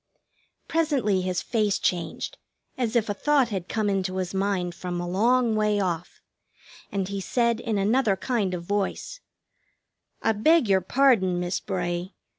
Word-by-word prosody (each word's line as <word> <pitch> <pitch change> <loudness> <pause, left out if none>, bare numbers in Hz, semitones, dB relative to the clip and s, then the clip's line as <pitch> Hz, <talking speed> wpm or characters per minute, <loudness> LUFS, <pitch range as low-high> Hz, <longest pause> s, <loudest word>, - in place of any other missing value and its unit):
Presently 275 - +1
his 185 -1 -2
face 210 -4 +1
changed, 170 -3 -2 0.4
as 245 -2 -2
if 230 -2 +2
a 205 - -1
thought 275 +3 +2
had 190 -4 -4
come 215 -2 0
into 190 -2 -1
his 185 -1 -3
mind 190 -2 -1
from 175 0 -5
a 175 - -3
long 230 +5 +2
way 210 -1 +2
off, 175 -3 -3 0.7
and 195 -2 -1
he 200 0 -4
said, 235 +2 +1
in 230 -3 -2
another 210 +1 +2
kind 200 -4 -1
of 170 - -6
voice: 205 - -2 1.0
"I 225 - +3
beg 260 +6 +3
your 190 -1 +3
pardon, 190 -5 +3
Miss 180 +1 -1
Bray. 180 -1 -3
200 Hz, 155 wpm, -25 LUFS, 185-235 Hz, 1.0 s, I